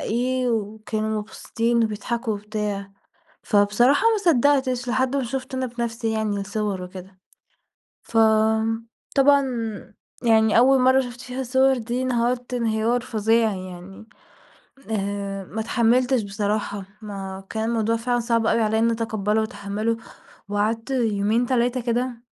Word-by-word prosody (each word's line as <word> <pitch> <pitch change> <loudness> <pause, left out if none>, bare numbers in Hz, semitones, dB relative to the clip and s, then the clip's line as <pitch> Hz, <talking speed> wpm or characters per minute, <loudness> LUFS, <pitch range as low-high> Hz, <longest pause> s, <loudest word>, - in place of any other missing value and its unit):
إيه 250 +2 0
وكانوا 215 0 -2
مبسوطين 230 +2 -1
وبيضحكوا 225 +2 -2
وبتاع، 205 -1 -4 0.5
فبصراحة 210 +7 +3
ما 440 - +2
صدقتش 260 -2 +2
لحد 260 +2 +1
ما 275 - +1
شُفت 260 +2 -5
أنا 260 0 -1
بنفسي 235 -1 -3
يعني 215 -2 -1
الصور 200 -1 -3
وكده. 185 +1 -10 0.8
فطبعًا 225 +5 +2 0.8
يعني 220 -1 +4
أول 265 +2 +5
مرّة 260 +1 +5
شُفت 245 -1 -8
فيها 255 +1 -5
الصور 260 +1 +3
دي 240 +2 -3
انهرت 245 0 -1
انهيار 230 0 +1
فظيع 225 -2 +1
يعني، 185 +3 -9 0.8
آآ 200 -1 -3
ما 220 +4 -5
اتحملتش 245 +2 +2
بصراحة، 205 0 -2 0.2
ما 195 -2 -7
كان 220 0 -2
الموضوع 230 0 +1
فعلًا 240 +1 0
صعب 230 -1 +1
أوي 230 - +2
عليَّ 220 0 +1
إني 230 +1 +3
أتقبله 220 -2 0
وأتحمله 215 +1 -2 0.5
وقعدت 220 +4 -1
يومين، 225 -1 +1
3 250 0 +1
كده 240 0 -2
225 Hz, 125 wpm, -23 LUFS, 210-245 Hz, 0.8 s, أول